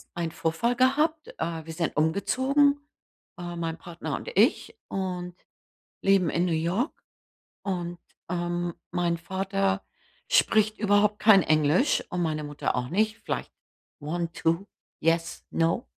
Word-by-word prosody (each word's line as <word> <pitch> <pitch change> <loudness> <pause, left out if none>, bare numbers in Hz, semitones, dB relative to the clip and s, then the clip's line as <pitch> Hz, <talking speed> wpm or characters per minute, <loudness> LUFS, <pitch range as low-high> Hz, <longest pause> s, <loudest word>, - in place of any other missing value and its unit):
einen 170 -2 -2
Vorfall 165 +12 0
gehabt. 300 +5 +2
Äh, 160 -1 -3
wir 165 - -7
sind 165 -1 -2
umgezogen, 260 - +2 0.6
äh, 175 0 -6
mein 165 -1 -3
Partner 165 -5 -5
und - - -7
ich 255 - +3
und 180 -2 -4 0.7
leben 195 -4 +4
in 170 - +1
New 170 - 0
York 175 - 0 0.7
und, 175 -3 -3 0.3
ähm, 175 -1 -2 0.2
mein 175 -1 0
Vater 195 +2 -1 0.4
spricht 215 0 +3
überhaupt 210 0 +3
kein 200 -4 +7
Englisch, 155 - +3
und 180 - -2
meine 155 -2 -1
Mutter 145 0 -2
auch 125 0 -2
nicht. 215 - +1
Vielleicht: - - -3 0.5
„One, 170 +3 -3
two, 165 +4 0 0.3
yes, 165 +1 0
no.“ 165 +10 +1
175 Hz, 130 wpm, -27 LUFS, 165-210 Hz, 0.7 s, kein